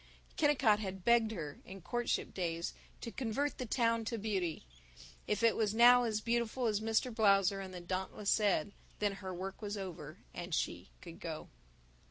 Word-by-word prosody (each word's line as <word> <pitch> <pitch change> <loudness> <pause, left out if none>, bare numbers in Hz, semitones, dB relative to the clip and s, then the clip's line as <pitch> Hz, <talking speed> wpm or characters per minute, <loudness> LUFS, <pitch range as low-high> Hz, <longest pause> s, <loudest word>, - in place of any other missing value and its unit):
Kennicott 275 -8 +4
had 190 -3 -5
begged 235 -2 +5
her, 160 -9 -6
in 195 +1 -10
courtship 240 +4 -1
days, 170 -2 -2 0.3
to 230 - -5
convert 270 +4 -2
the 250 - -3
town 230 0 +2
to 230 +1 -2
beauty. 190 - -2 0.6
If 210 +2 0
it 230 - +5
was 215 -1 0
now 245 +1 +7
as 215 -2 -1
beautiful 235 +2 0
as 210 -3 +2
Mr. 225 +2 +1
Blausser 200 -3 +4
and 190 - -8
the 180 -1 -7
Dauntless 190 +3 -2
said, 205 -1 +2 0.3
then 205 -1 +1
her 190 -1 -5
work 190 +3 -6
was 205 0 -3
over, 165 -6 -7 0.2
and 175 -2 -3
she 90 +2 -2
could 170 -2 -10
go. 160 -2 -6
210 Hz, 175 wpm, -34 LUFS, 185-230 Hz, 0.6 s, now